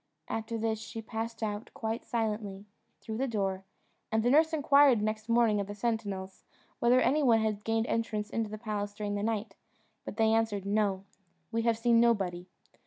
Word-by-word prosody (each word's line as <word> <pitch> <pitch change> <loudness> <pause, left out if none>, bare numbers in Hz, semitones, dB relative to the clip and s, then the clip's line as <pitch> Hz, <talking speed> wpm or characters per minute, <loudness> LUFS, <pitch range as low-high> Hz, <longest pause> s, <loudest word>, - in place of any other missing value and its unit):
After 225 +1 -3
this 220 -1 -1
she 225 +1 -7
passed 225 0 -5
out, 210 +1 -3
quite 225 +1 -3
silently, 210 -4 -3 0.4
through 220 -1 -5
the 265 +2 0
door; 195 -4 -2 0.5
and 220 0 +2
the 245 - +3
nurse 315 +3 +5
inquired 285 -5 +5
next 215 +1 -2
morning 230 -3 +3
of 200 - -2
the 205 - -6
sentinels 205 -4 -3 0.4
whether 245 +2 +4
any 290 +4 +3
one 235 -5 +4
had 215 -1 -1
gained 225 0 +1
entrance 215 -3 -2
into 225 -2 -1
the 215 - -6
palace 205 -2 -4
during 205 -1 -3
the 205 - -2
night, 220 0 -2 0.5
but - - -8
they 220 -1 +3
answered, 220 -3 0
"No 200 -2 +1 0.5
we 230 0 0
have 230 -1 +2
seen 230 0 +4
nobody." 190 -7 +1
220 Hz, 180 wpm, -30 LUFS, 205-230 Hz, 0.5 s, nurse